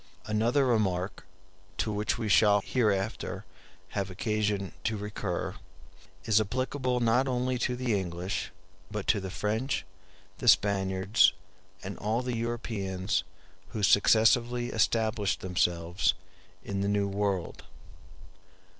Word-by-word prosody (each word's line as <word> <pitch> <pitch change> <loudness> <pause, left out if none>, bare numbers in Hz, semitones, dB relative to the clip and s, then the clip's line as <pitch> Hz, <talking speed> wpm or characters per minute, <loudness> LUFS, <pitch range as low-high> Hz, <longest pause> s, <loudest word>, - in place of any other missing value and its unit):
Another 115 +6 +2
remark, 95 -7 0 0.5
to 110 - 0
which 105 +1 -1
we 115 -2 -3
shall 105 0 +5
hereafter 105 -3 -1 0.4
have 100 -2 -3
occasion 105 0 -1
to 110 0 -1
recur, 100 -3 -3 0.7
is 110 -1 +4
applicable 130 +3 -1
not 120 +3 +2
only 125 0 0
to 125 0 0
the 125 -2 -1
English, 90 +2 -3 0.4
but 105 -2 -4
to 110 - +3
the 95 -1 -5
French, 110 +7 -2 0.5
the - - -4
Spaniards, 95 -1 +4 0.5
and 100 +1 -6
all 110 +4 -1
the 125 -1 -2
Europeans 105 -5 -2 0.5
who 110 -3 -3
successively 120 +4 +4
established 110 -2 +1
themselves 90 -1 +1 0.5
in 100 -1 -3
the 100 - 0
New 100 -1 +1
World. 100 -3 -2
105 Hz, 115 wpm, -29 LUFS, 95-115 Hz, 0.7 s, shall